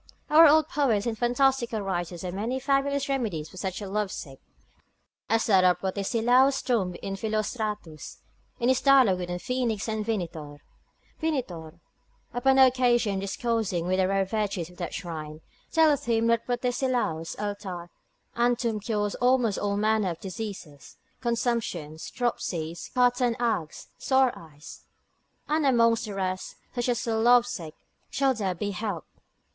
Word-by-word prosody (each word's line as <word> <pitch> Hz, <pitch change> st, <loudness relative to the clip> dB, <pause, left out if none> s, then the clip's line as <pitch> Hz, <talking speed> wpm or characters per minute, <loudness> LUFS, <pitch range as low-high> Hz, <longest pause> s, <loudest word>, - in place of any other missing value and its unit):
Our 320 Hz, +2 st, +9 dB
old 310 Hz, +1 st, +5 dB
poets 245 Hz, -10 st, +1 dB
and 235 Hz, -2 st, -1 dB
fantastical 240 Hz, -1 st, +1 dB
writers 175 Hz, -3 st, -3 dB
have 180 Hz, -1 st, -4 dB
many 230 Hz, +7 st, -2 dB
fabulous 275 Hz, +1 st, 0 dB
remedies 215 Hz, -, -2 dB
for -, -, -14 dB
such 190 Hz, +2 st, -4 dB
as -, -, -5 dB
are -, -, -8 dB
lovesick, 190 Hz, -10 st, -4 dB, 0.9 s
as 225 Hz, +1 st, +2 dB
that 190 Hz, -4 st, +4 dB
of 180 Hz, -1 st, +4 dB
Protesilaus' 235 Hz, +8 st, +2 dB
tomb 195 Hz, -8 st, 0 dB
in 195 Hz, 0 st, -3 dB
Philostratus, 215 Hz, -5 st, -4 dB, 0.4 s
in 240 Hz, -, +2 dB
his 260 Hz, -1 st, +3 dB
dialogue 260 Hz, -9 st, +5 dB
between 180 Hz, 0 st, -3 dB
Phoenix 235 Hz, 0 st, -2 dB
and 215 Hz, -1 st, -2 dB
Vinitor: 165 Hz, -9 st, -4 dB, 0.6 s
Vinitor, 175 Hz, -, -3 dB, 0.5 s
upon 265 Hz, +2 st, +3 dB
occasion 245 Hz, -6 st, +4 dB
discoursing 200 Hz, -3 st, -1 dB
of -, -, +3 dB
the 185 Hz, 0 st, +2 dB
rare 195 Hz, 0 st, +1 dB
virtues 195 Hz, -4 st, -2 dB
of 180 Hz, -, -18 dB
that 175 Hz, -3 st, -4 dB
shrine, 155 Hz, -4 st, -6 dB, 0.3 s
telleth 305 Hz, -3 st, +3 dB
him 230 Hz, -1 st, +1 dB
that 230 Hz, -1 st, +1 dB
Protesilaus' 245 Hz, -9 st, -1 dB
altar 195 Hz, -4 st, -5 dB, 0.4 s
and 240 Hz, 0 st, +2 dB
tomb 230 Hz, -3 st, -1 dB
cures 205 Hz, -1 st, -1 dB
almost 245 Hz, -4 st, +2 dB
all 200 Hz, 0 st, -1 dB
manner 215 Hz, -2 st, +2 dB
of 170 Hz, -, -5 dB
diseases, 185 Hz, -7 st, -8 dB, 0.2 s
consumptions, 230 Hz, -10 st, -2 dB
dropsies, 170 Hz, -9 st, -3 dB
quartan 245 Hz, -1 st, +2 dB
agues, 220 Hz, -10 st, -2 dB
sore 265 Hz, -2 st, +3 dB
eyes: 150 Hz, -2 st, -12 dB, 0.7 s
and 310 Hz, +1 st, +1 dB
amongst 230 Hz, -4 st, +3 dB
the 205 Hz, -2 st, -6 dB
rest, 185 Hz, -1 st, -3 dB, 0.2 s
such 245 Hz, 0 st, -1 dB
as 240 Hz, 0 st, -1 dB
are 225 Hz, -1 st, 0 dB
lovesick 240 Hz, -8 st, +2 dB, 0.3 s
shall 275 Hz, -1 st, +2 dB
there 195 Hz, -6 st, -2 dB
be 205 Hz, +4 st, -3 dB
helped. 200 Hz, -3 st, -4 dB
220 Hz, 145 wpm, -27 LUFS, 185-245 Hz, 0.9 s, Our